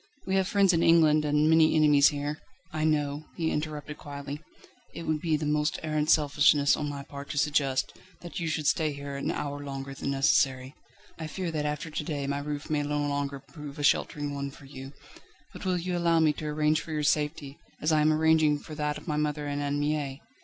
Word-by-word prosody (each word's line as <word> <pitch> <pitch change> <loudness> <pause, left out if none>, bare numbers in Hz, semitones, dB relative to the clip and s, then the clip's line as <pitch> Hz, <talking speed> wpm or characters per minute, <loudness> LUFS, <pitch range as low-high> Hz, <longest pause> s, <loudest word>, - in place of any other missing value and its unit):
We 190 - -2
have 190 -1 +2
friends 195 -3 +3
in 165 - +2
England, 155 -3 +5
and 150 +1 +2
many 160 0 +5
enemies 150 -2 +6
here 145 +1 -2 0.2
..." 165 - -32
"I 155 0 0
know," 150 -1 0
he 160 -1 0
interrupted 150 -1 -4
quietly; 145 +1 -7 0.5
"it 170 - -6
would 155 -2 -1
be 160 -3 +1
the 150 - -4
most 150 0 +1
arrant 155 -1 -1
selfishness 145 -1 +4
on 150 -1 -3
my 140 -1 -6
part 140 0 -9
to - - -4
suggest, 140 -3 +1 0.3
that 175 +2 -6
you 170 - -2
should 155 -1 -2
stay 155 0 +2
here 140 0 -7
an 140 - -3
hour 145 0 -3
longer 135 -1 -6
than 135 - -4
necessary. 135 -1 +2 0.5
I 160 - -4
fear 175 +2 -4
that 150 -2 -1
after 150 +2 -4
to 150 - -3
day 145 -2 -3
my 140 +1 -1
roof 145 0 -5
may 150 -2 0
no 145 0 -2
longer 145 -1 -1
prove 145 0 -10
a 145 - -4
sheltering 145 0 +1
one 140 0 -3
for 140 0 -14
you. 135 0 -9 0.6
But - - -9
will 185 -1 +1
you 180 +1 -2
allow 170 -1 +2
me 155 -2 +4
to 155 - -6
arrange 150 +1 +1
for 165 - -9
your 150 -1 -1
safety, 150 -1 -1 0.2
as 155 - 0
I 155 -1 +4
am 155 +1 +4
arranging 155 -1 +3
for 155 - -11
that 150 0 -2
of - - -13
my 150 -2 -1
mother 150 0 -1
and 145 0 -2
Anne 145 0 -1
Mie? 145 -2 -1
150 Hz, 225 wpm, -28 LUFS, 145-155 Hz, 0.6 s, enemies